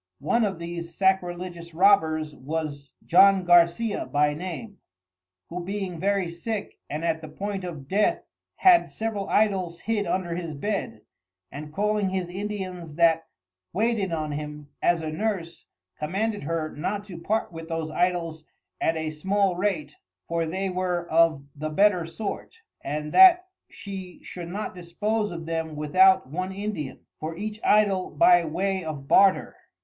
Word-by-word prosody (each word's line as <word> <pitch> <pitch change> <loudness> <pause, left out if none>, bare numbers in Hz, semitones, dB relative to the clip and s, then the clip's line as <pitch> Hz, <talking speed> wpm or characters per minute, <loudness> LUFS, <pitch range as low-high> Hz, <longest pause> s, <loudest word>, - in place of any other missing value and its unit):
One 235 - +1
of 195 -4 -1
these 170 0 -6
Sacrilegious 175 -3 -1
Robbers 160 -5 +3
was 145 0 -4 0.2
John 195 +2 +6
Garcia 175 +6 +3
by 150 0 +2
name, 185 +6 -7 0.7
who 175 +1 -5
being 190 -2 -4
very 195 0 +1
sick 200 +5 -5
and 155 +3 -3
at 160 -1 0
the 155 - -8
point 195 +4 -4
of 155 -7 -7
dath, 205 +6 +1 0.3
had 360 -2 +5
several 220 -3 -3
Idols 190 -5 +1
hid 215 -2 -1
under 185 -2 -1
his 170 -3 -5
Bed, 195 - -3 0.5
and 150 +1 -8
calling 210 +2 0
his 185 -2 -2
Indians 185 -4 -5
that 165 -1 +3 0.5
waited 210 -1 0
on 155 -2 -2
him, 150 0 -6
as 175 -1 +2
a 155 - -3
Nurse, 185 -2 -3 0.3
commanded 200 +4 -2
her 160 -1 -2
not 200 +7 -2
to 185 -5 -9
part 220 +4 -1
with 165 -1 -8
those 165 -1 -3
Idols 170 -2 -1 0.4
at 165 - +1
a 160 -1 -2
small 190 +4 +1
rate 175 -6 -2 0.3
for 165 -1 -1
they 190 +4 -2
were 180 -2 -2
of 160 -3 +3
the 155 +2 -4
better 180 0 +3
sort, 210 - -5 0.3
and 150 +1 -3
that 370 -1 +7 0.2
she 190 -4 -8
should 175 -2 -7
not 205 +4 -4
dispose 210 +5 -2
of 165 -1 -7
them 160 -1 -3
without 185 +4 +4
one 185 +7 -3
Indian, 190 -8 -5
for 160 +1 -5
each 210 +2 -5
Idol 200 -3 +3
by 175 -1 +5
way 190 +4 -1
of 145 -4 -6
Barter. 195 +4 +4
175 Hz, 150 wpm, -26 LUFS, 160-200 Hz, 0.7 s, that